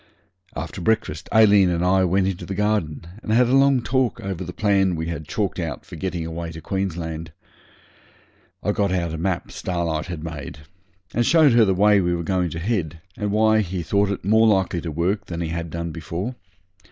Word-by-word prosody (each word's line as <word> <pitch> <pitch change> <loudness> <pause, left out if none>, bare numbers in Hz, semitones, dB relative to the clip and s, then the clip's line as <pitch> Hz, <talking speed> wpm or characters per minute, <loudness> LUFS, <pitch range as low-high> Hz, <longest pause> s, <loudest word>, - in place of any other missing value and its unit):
After 95 - -5
breakfast 95 -5 -1
Aileen 105 -4 +6
and 85 0 0
I 95 +1 +3
went 95 +2 +2
into 95 -2 -3
the 95 - -4
garden 105 -7 -1 0.2
and 110 - -4
had 120 +2 +4
a 130 - +4
long 135 -2 +4
talk 130 -2 0
over 95 -2 -4
the 90 - -6
plan 95 -2 +2
we 80 +1 -3
had 80 -3 -5
chalked 100 -3 -2
out 80 -6 -4
for - - -10
getting 90 -3 -3
away 85 0 -5
to 80 - -8
Queensland. 80 -3 -4 1.3
I - - +1
got 100 -2 0
out 85 -3 -1
a 80 - -4
map 90 0 -2
Starlight 85 -2 -2
had 85 -4 -6
made 75 -3 -6 0.6
and 120 - +2
showed 155 +2 +5
her 115 -1 +5
the 95 -2 +1
way 105 +1 +5
we 90 -1 +1
were 85 - -3
going 90 0 0
to 80 - -5
head, 85 -5 -2 0.2
and 105 -1 -2
why 110 +1 +4
he 90 -3 -2
thought 100 +4 +1
it 100 -2 -4
more 110 +2 +5
likely 95 -4 +2
to 80 - -4
work 90 +7 -1
than 85 -1 -5
he 85 -2 -2
had 85 0 -4
done 85 +1 -4
before. 85 - -4
95 Hz, 205 wpm, -23 LUFS, 85-105 Hz, 1.3 s, Aileen